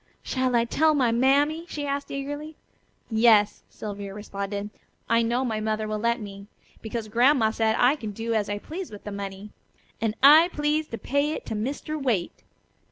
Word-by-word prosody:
"Shall 255 -1 0
I 235 0 +3
tell 310 +5 +2
my 255 -5 +2
mammy?" 285 +7 +2
she 295 -1 -4
asked 280 0 -3
eagerly. 290 +3 -5 0.6
"Yes," 220 -2 +4
Sylvia 200 -2 -7
responded. 200 0 -5 0.4
"I 230 +1 +3
know 240 +3 0
my 220 -3 -1
mother 215 0 -2
will 215 0 -2
let 235 +3 +1
me. 200 -2 -9 0.3
Because 220 0 -4
Grandma 240 +1 +3
said 220 0 +1
I 255 +4 +4
could 215 -8 -7
do 230 +1 -2
as 210 -2 0
I 205 - -2
pleased 330 - -7
with 205 - -10
the 210 - -6
money. 200 +1 -7 0.5
And 225 -1 0
I 310 +5 +8
please 300 +1 0
to 230 - -6
pay 285 +5 0
it - - -6
to - - -4
Mr. 280 +7 -3
Waite." 220 -10 -1
230 Hz, 180 wpm, -25 LUFS, 210-280 Hz, 0.6 s, I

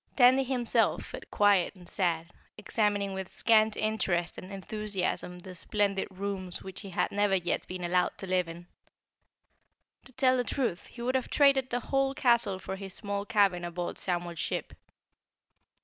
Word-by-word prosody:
Tandy 260 +1 +6
himself 250 -3 +1
felt - - -9
quiet 205 -2 +3
and 180 -2 -15
sad, 170 -3 -1 0.3
examining 205 -2 0
with 190 -1 -5
scant 220 -1 +3
interest 190 -5 0
and 185 - -10
enthusiasm 195 -2 -3
the 185 +1 -10
splendid 200 +2 0
rooms 190 -1 -5
which 190 -1 -7
he 200 - -8
had 180 - 0
never 205 -1 +2
yet 175 -2 -1
been 180 0 -6
allowed 180 +1 +1
to - - -7
live 185 -2 +1
in. 170 +1 -9 1.4
To - - -15
tell 260 0 +3
the 250 - +1
truth, 240 -8 -2
he 235 - -9
would 255 +1 0
have 260 -1 0
traded 275 -2 +4
the 245 - 0
whole 270 +1 0
castle 235 -7 +3
for 190 +1 -6
his 195 -1 -6
small 200 -1 -3
cabin 195 -5 +3
aboard 175 0 -4
Samuel's 175 -2 -3
ship. - - -3
200 Hz, 165 wpm, -29 LUFS, 180-230 Hz, 1.4 s, Tandy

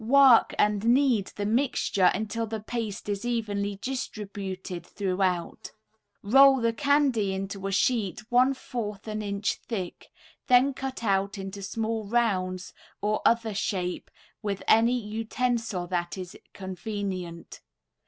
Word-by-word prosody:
Work 260 0 +6
and 210 -1 +2
knead 240 -3 +3
the 205 - -3
mixture 220 -4 +2
until 220 +3 -2
the 220 0 -4
paste 215 -2 -5
is 205 0 -2
evenly 205 -4 -1
distributed 200 -7 -5
throughout. 185 -2 -2 0.5
Roll 270 +5 +7
the 230 -1 +1
candy 270 -7 +2
into 195 0 -4
a - - -2
sheet 200 -2 +1
one 255 +3 +4
fourth 220 -5 -5
an 215 0 -3
inch 200 0 -1
thick, 190 -7 -5 0.4
then 255 +2 +5
cut 265 -2 -5
out 195 -1 +1
into 195 +1 -6
small 220 +1 -3
rounds 185 -6 0 0.3
or 210 +1 0
other 230 -2 +2
shape 185 -3 -2 0.3
with 200 -2 -3
any 230 +3 +4
utensil 225 -2 -2
that 175 0 -2
is 185 -1 -7 0.2
convenient. 190 -2 -5
210 Hz, 125 wpm, -27 LUFS, 195-235 Hz, 0.5 s, Roll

